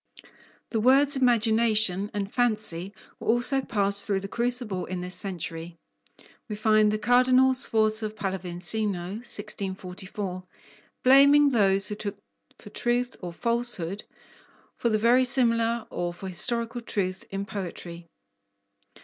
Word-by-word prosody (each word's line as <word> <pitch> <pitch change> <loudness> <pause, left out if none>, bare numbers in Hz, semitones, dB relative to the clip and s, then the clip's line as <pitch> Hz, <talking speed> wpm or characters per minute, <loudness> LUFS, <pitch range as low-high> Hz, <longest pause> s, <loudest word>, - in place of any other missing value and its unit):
The 225 - 0
words 275 +5 +4
"imagination" 220 -5 +2
and 200 0 -4
"fancy" 215 -7 +1 0.3
were - - -9
also 245 +4 +2
passed 200 -5 -1
through 195 -2 -1
the 195 - -6
crucible 235 -4 -2
in 185 0 -4
this 180 0 -4
century. 170 -3 -5 0.7
We 210 - -4
find 215 0 +3
the 215 - 0
Cardinal 255 +3 +4
Sforza 220 -3 +1
Pallavicino 190 -1 -4
(1644) 190 -3 -4 0.6
blaming 280 +2 +6
those 195 -5 +3
who 210 - -5
look 205 -1 -4 0.4
for 210 - -14
truth 245 +2 -1
or 175 -2 -6
falsehood, 230 -3 -3 0.7
for 235 - -1
the 215 - +2
verisimilar 235 -1 +2
or 175 0 -3
for 190 - -8
historical 235 +6 -1
truth, 190 -4 -3
in 195 0 -4
poetry. 175 -4 -7
215 Hz, 120 wpm, -26 LUFS, 190-240 Hz, 0.7 s, blaming